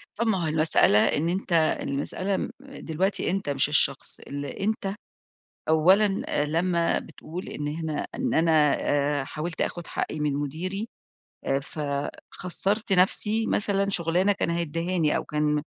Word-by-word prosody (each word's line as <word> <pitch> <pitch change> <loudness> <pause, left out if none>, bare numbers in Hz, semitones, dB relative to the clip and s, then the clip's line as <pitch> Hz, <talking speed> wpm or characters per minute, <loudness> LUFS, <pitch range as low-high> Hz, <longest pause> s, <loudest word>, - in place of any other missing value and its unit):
طب 235 - -1
ما 190 -6 +1
هو - - 0
المسألة، 155 -8 +4
إن 150 +9 +2
أنت 185 0 -2 0.3
المسألة 185 +8 -2
م - - -3
دلوقتي 195 - -2
أنت 195 -4 -2
مش 140 0 +1
الشخص، 140 -2 +2
اللي 140 -1 -6
أنت 200 -1 -1 0.8
أولًا 190 +6 +4
آآ، 145 - 0
لمّا 170 +2 +1
بتقول 175 +4 -9
إن 145 - -4
هنا 155 0 -3
إن 255 -1 -1
أنا 165 +1 +3 0.3
آآ 145 -1 +1
حاولت 155 +5 -5
آخُد 175 -1 -2
حقي 155 - -3
من 150 -1 0
مديري، 170 +10 -3 0.6
آآ، 135 - +1
ف 140 +3 -9 0.5
خَسّرت 195 +3 0
نفسي 210 +4 +3
مثلًا 200 -1 +1
شُغلانة 180 +2 +2
كان 200 - -1
هيديهاني، 170 0 0
أو - - -1
كان 150 0 0
170 Hz, 145 wpm, -26 LUFS, 150-195 Hz, 0.8 s, المسألة